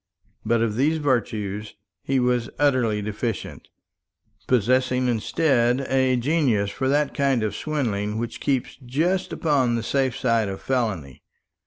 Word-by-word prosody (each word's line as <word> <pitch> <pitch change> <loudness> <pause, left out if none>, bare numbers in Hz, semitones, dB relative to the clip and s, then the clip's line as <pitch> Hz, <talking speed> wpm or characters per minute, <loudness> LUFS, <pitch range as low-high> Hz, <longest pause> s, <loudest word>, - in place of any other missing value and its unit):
But 115 -1 +2
of 110 -1 -1
these 150 +5 +2
virtues 110 -7 -2 0.3
he 135 0 0
was 125 -1 +1
utterly 125 -7 +2
deficient, 110 +1 -4 0.8
possessing 125 +2 +2
instead 125 +1 +1
a 130 -1 +2
genius 120 -6 +1
for 130 - -2
that 145 +1 +1
kind 135 -5 +1
of 105 -2 -2
swindling 110 -9 -2
which 115 0 -4
keeps 135 -3 -1
just 165 +10 0
upon 135 -7 +1
the 115 - -2
safe 130 0 0
side 115 -4 +1
of 95 - -5
felony. 105 - -2
125 Hz, 135 wpm, -24 LUFS, 110-135 Hz, 0.8 s, But